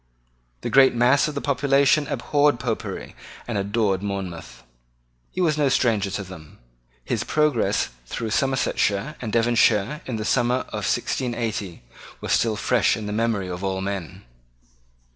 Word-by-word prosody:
The 120 - -4
great 135 -1 +6
mass 125 +5 +4
of 150 - -5
the 140 - -2
population 140 +1 +3
abhorred 145 -3 +1
Popery 120 -4 -4 0.3
and 120 - -3
adored 100 -1 0
Monmouth. 90 -11 -6 0.7
He 185 - -4
was 155 -4 +2
no 145 -2 +3
stranger 110 -6 +2
to 100 +1 -3
them. 85 -5 -12 0.5
His - - -1
progress 150 -6 +1 0.2
through 110 - -4
Somersetshire 135 -2 0
and 110 -3 -4
Devonshire 115 +2 +2
in 125 - -3
the 110 -1 -3
summer 125 +3 +2
of - - -3
1680 110 - -2 0.4
was - - -4
still 115 -2 +2
fresh 110 -2 +2
in 110 - -6
the 105 - -3
memory 110 -3 0
of 90 +1 -6
all 95 -1 -1
men. 95 -3 -5
115 Hz, 145 wpm, -23 LUFS, 100-135 Hz, 0.7 s, great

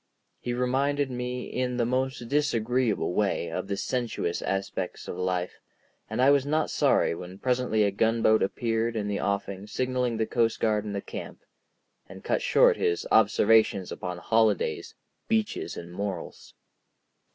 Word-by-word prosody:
He 120 - -3
reminded 135 +3 0
me 125 0 -3
in 125 -1 -2
the 120 - +2
most 130 0 -1
disagreeable 120 -7 +1
way 95 -5 0
of 95 +3 -3
the 100 - -2
sensuous 115 -7 -2
aspects 95 -1 -3
of - - -5
life, 90 0 -2 0.5
and 110 +2 -3
I 130 +2 +6
was 140 -2 +4
not 155 +2 0
sorry - - +3
when 90 +2 -8
presently 125 -2 +1
a 100 - +2
gunboat 110 +1 +3
appeared 115 +3 0
in 105 -2 -2
the 100 -1 -2
offing 100 0 -2
signalling 125 0 -1
the 110 - +1
coastguard 110 -2 +1
and 100 -1 -4
the 100 - -2
camp, - - -8 0.7
and - - -11
cut - - 0
short - - +4
his 85 - 0
observations 110 -2 +4
upon 90 -1 -5
holidays, 110 +1 +1 0.3
beaches, 220 -1 -1
and 85 0 -8
morals. 100 -2 -6
110 Hz, 150 wpm, -27 LUFS, 100-125 Hz, 0.7 s, I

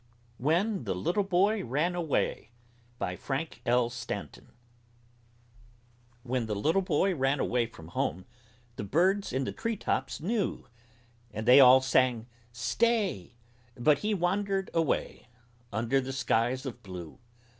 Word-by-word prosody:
WHEN 170 - +1
THE 95 -3 -1
LITTLE 175 - 0
BOY 195 +3 +2
RAN 150 +9 0
AWAY 165 -9 -1 0.5
BY 90 - -3
FRANK 140 +4 -4
L. 120 0 +3
STANTON 105 - -7 1.7
When 125 -2 -2
the 105 - -2
little 160 - +2
boy 185 +2 +1
ran 135 -2 +1
away 120 -2 +1
from 80 -8 -13
home 90 +1 -2 0.5
The - - -4
birds 185 - +1
in 130 +2 -1
the - - -3
treetops 230 -3 -2
knew, 200 +4 -2 0.6
And 110 +2 -5
they 125 +3 +9
all 130 0 +8
sang 130 -3 +2 0.3
"Stay!" 190 - 0 0.4
But 145 +4 +3
he 210 0 0
wandered 195 +2 -1
away 165 -4 -1 0.4
Under 120 +6 +1
the 135 +1 -5
skies 130 +1 0
of 125 -2 -6
blue. 90 -6 -9
135 Hz, 130 wpm, -29 LUFS, 120-180 Hz, 1.7 s, they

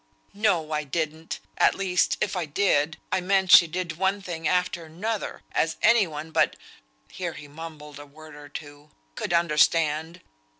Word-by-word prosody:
"No! 190 -7 +1
I 150 0 -1
didn't! 160 +2 -4 0.2
at - - +4
least 185 -2 +1
if 200 - -1
I 180 -2 -1
did, 155 -1 +1
I 185 - +1
meant 190 0 +1
she 170 - +9
did 170 0 -4
one 190 +2 +1
thing 170 -5 -4
after 180 -1 0
another, 200 +7 -4
as 160 - 0
any 235 -5 +5
one 155 0 -7
but" - - +2 0.6
(here 175 -3 -4
he 150 - -10
mumbled 150 -1 -10
a 145 - -10
word 155 +2 -14
or 145 0 -12
two) 145 0 -10 0.2
"could - - -4
understand. 165 0 +2
165 Hz, 165 wpm, -25 LUFS, 150-180 Hz, 0.6 s, she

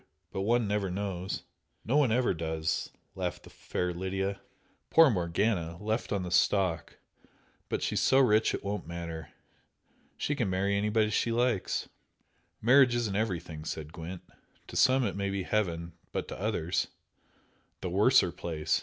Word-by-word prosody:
But 95 - -3
one 115 +2 +2
never 100 -1 0
knows 95 0 -3 0.2
" - - -44
"No, 130 +6 +2
one 145 -4 +4
never 120 -1 +2
does!" 80 -1 -2 0.2
laughed 90 -2 -4
the - - -14
fair 90 0 -3
Lydia 95 +2 -2 0.5
"Poor 160 -4 +7
Morgana! 85 -2 0
Left 110 +3 -2
on 100 -2 0
the 90 - -5
stalk! 95 -2 +2 0.7
But - - -1
she's - - 0
so 135 - +4
rich 110 -5 +4
it - - -7
won't 100 -3 -3
matter. 85 -2 -6 0.9
She 145 - -1
can 120 -9 0
marry 100 +2 +1
anybody 105 +1 +2
she 115 - +1
likes." 120 -4 0 0.8
"Marriage 125 +1 +6
isn't 115 -5 -1
everything," 90 -7 -2
said 80 0 -5
Gwent 85 +1 -7 0.5
"To - - -9
some 130 0 +5
it 100 - -2
may 100 0 -1
be 100 -1 -2
heaven, 85 -5 -1 0.2
but - - -3
to - - -6
others 95 -5 0 0.5
" - - -38
"The 90 - -3
worser 105 0 +5
place!" 80 -3 -1
100 Hz, 160 wpm, -30 LUFS, 85-110 Hz, 0.9 s, Poor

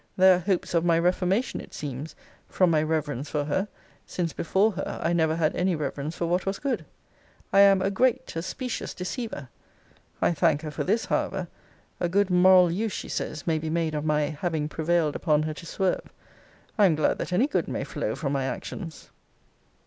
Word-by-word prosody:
There 185 0 +7
are - - -3
hopes 180 0 -1
of 170 -1 +2
my 170 -1 +3
reformation, 180 +6 +1
it - - -12
seems, 145 +1 -6 0.3
'from 185 -2 +3
my 155 -2 +3
reverence 150 -3 -2
for 150 -1 -1
her; 190 +7 0 0.4
since 170 -3 -2
before 195 +6 +2
her 190 -1 -5
I 165 +1 0
never 160 -2 +2
had 160 -2 +1
any 180 0 +1
reverence 145 +1 -4
for 170 - -1
what 180 +3 0
was 195 +1 -1
good!' 245 - -2 0.7
I 195 - +6
am 195 -1 +6
'a 195 - +1
great, 250 +1 +1
a 165 - -1
specious 250 +7 -4
deceiver.' 180 - -5 0.7
I - - +2
thank 160 -2 +2
her 155 - -4
for 145 - -3
this, 220 +5 +1
however. - - -1 0.5
A 175 - 0
good 200 +1 +2
moral 180 -1 +6
use, 210 +3 -1
she - - -5
says, 155 - -4
may 160 -2 +1
be 155 0 -4
made 160 -1 0
of 150 -1 -2
my 150 -1 +1
'having 155 -1 -2
prevailed 160 -1 0
upon 155 -3 +2
her 155 0 -2
to 170 - -10
swerve.' 190 +1 -1 0.7
I 205 - +7
am 165 - +2
glad 155 - +1
that - - -4
any 185 +9 +3
good 295 - -1
may - - -3
flow - - -3
from 145 -4 -2
my 135 -1 0
actions. 160 +4 -6
170 Hz, 200 wpm, -26 LUFS, 155-190 Hz, 0.7 s, There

